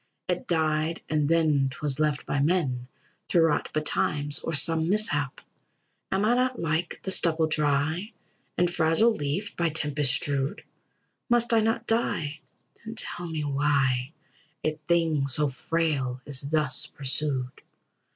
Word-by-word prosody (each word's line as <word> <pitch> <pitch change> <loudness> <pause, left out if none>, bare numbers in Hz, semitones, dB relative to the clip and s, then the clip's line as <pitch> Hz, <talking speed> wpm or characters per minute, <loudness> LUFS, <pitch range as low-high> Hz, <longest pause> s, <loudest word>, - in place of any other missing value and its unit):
It 180 -1 -2
died, 160 -1 0
and 150 -2 +1
then 155 -5 +3
'twas 145 -1 -1
left 150 -2 0
by 145 - -1
men 140 -6 0 0.4
To 175 - +2
rot 165 -3 +2
betimes, 145 -1 0
or 165 - -3
some 160 +2 +3
mishap. 150 -10 +1 0.7
Am 195 +2 +1
I 230 - +4
not 255 0 +1
like 165 +1 -2
the 190 - -1
stubble 165 -3 +3
dry 155 +5 0 0.5
And 175 - +3
fragile 165 +8 +3
leaf 160 +3 -3
by 170 -1 +1
tempest 150 -3 +1
strewed? 140 +6 -2 0.7
Must 240 0 +2
I 225 - +5
not 225 +2 0
die, 160 -10 -1 0.4
then 225 +1 -7
tell 175 -5 0
me 160 -2 -3
why 140 -2 +1 0.5
A 155 - +1 0.2
thing 165 -5 +2
so 145 +2 +2
frail 135 -2 -1
is 140 -3 -5
thus 150 -1 +1
pursued? 135 -2 -2
155 Hz, 140 wpm, -26 LUFS, 145-170 Hz, 0.7 s, I